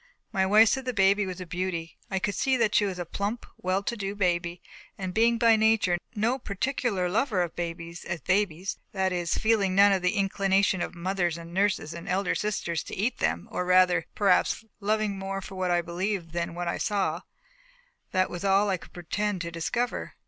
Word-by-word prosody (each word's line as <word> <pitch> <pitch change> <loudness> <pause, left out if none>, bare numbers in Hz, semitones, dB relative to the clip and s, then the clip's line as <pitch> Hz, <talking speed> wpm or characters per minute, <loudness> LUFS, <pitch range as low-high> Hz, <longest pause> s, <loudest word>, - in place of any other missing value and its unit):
My 190 0 +1
wife 215 +2 +7
said 265 -1 -1
the 250 -2 -2
baby 200 0 +3
was 185 -1 -5
a 185 - -6
beauty. 170 -2 -4
I 195 - -1
could 200 +2 -1
see 265 +6 +1
that 225 -3 +2
she 205 - +4
was 190 -2 -3
a 175 - -4
plump, 200 +7 -3
well 185 +2 0
to 235 - -2
do 200 -2 -4
baby; 175 -3 0 0.4
and 185 -2 -4
being 230 +2 +3
by 230 -1 +5
nature 220 -5 +3 0.2
no 230 +5 +1
particular 215 -3 -1
lover 210 0 +1
of 170 - -6
babies 170 0 -5
as 175 -1 -4
babies 185 +2 0
that 190 -1 +1
is, 175 -1 -1
feeling 210 -4 +2
none 200 +1 +7
of 195 -2 +2
the 180 0 +1
inclination 195 -1 +2
of - - -4
mothers 175 -1 -1
and 170 0 -10
nurses 190 -5 +1
and 170 - -8
elder 185 0 +1
sisters 190 -6 -2
to - - -6
eat 220 +7 -1
them, 85 +2 0
or - - -1
rather, 180 -2 +4
perhaps, 205 +2 +2
loving 210 -1 0
more 195 0 -3
for 195 +1 -9
what 185 -1 -1
I 175 -1 +2
believed 175 0 -3
than 170 0 -3
what 175 0 -3
I 170 - -2
saw 205 -2 0 0.9
that 185 -1 +1
was 175 - -5
all 200 +1 +3
I 185 - +1
could - - -16
pretend 190 +3 -2
to 170 0 -4
discover. 235 +9 -2
190 Hz, 205 wpm, -27 LUFS, 175-205 Hz, 0.9 s, wife